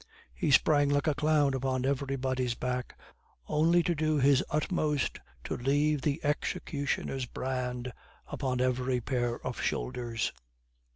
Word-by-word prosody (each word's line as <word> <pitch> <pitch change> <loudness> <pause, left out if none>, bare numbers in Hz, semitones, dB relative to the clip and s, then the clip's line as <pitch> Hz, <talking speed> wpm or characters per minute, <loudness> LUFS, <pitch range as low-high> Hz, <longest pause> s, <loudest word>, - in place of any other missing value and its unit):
He 65 - -1
sprang 145 +1 +5
like 145 0 +2
a 155 - +3
clown 150 -1 +2
upon 130 -1 -1
everybody's 130 -2 -1
back, 125 0 -3 0.5
only 165 +3 +3
to 175 - +1
do 155 -1 +1
his 140 -1 +4
utmost 150 -2 0 0.2
to - - -3
leave 145 +3 +1
the 145 +1 0
executioner's 140 -2 -2
brand 125 -1 -3 0.3
upon 130 -3 -2
every 125 0 +1
pair 120 -1 -1
of - - -3
shoulders. 115 - -2
135 Hz, 125 wpm, -30 LUFS, 125-150 Hz, 0.5 s, sprang